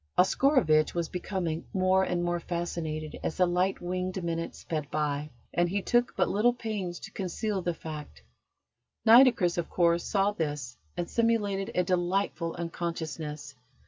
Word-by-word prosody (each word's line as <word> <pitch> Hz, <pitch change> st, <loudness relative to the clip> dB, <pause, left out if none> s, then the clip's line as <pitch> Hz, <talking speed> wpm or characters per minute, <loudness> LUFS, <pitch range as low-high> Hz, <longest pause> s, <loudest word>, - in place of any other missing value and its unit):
Oscarovitch 180 Hz, -, +4 dB
was 170 Hz, -2 st, -1 dB
becoming 175 Hz, -3 st, -3 dB
more 190 Hz, 0 st, +4 dB
and 180 Hz, -2 st, 0 dB
more 175 Hz, 0 st, 0 dB
fascinated 165 Hz, -3 st, -4 dB
as -, -, -3 dB
the 185 Hz, -, +5 dB
light 180 Hz, +2 st, +1 dB
winged 185 Hz, +1 st, -3 dB
minutes 165 Hz, 0 st, -3 dB
sped 155 Hz, -3 st, -4 dB
by, 150 Hz, -1 st, -1 dB, 0.2 s
and 175 Hz, 0 st, +2 dB
he 200 Hz, +3 st, 0 dB
took 240 Hz, +1 st, +2 dB
but 180 Hz, -, +2 dB
little 235 Hz, +4 st, +3 dB
pains 210 Hz, -7 st, -4 dB
to -, -, -9 dB
conceal 195 Hz, +2 st, -2 dB
the 175 Hz, -1 st, -1 dB
fact. 150 Hz, -, -8 dB, 0.8 s
Nitocris, 225 Hz, -7 st, +6 dB
of 170 Hz, -, -3 dB
course, 170 Hz, -1 st, +2 dB
saw 200 Hz, 0 st, +2 dB
this, 145 Hz, -9 st, -3 dB, 0.2 s
and 175 Hz, -, -2 dB
simulated 210 Hz, -4 st, +1 dB
a 180 Hz, -, +3 dB
delightful 180 Hz, -1 st, 0 dB
unconsciousness. 160 Hz, -4 st, -4 dB
175 Hz, 145 wpm, -29 LUFS, 160-195 Hz, 0.8 s, Nitocris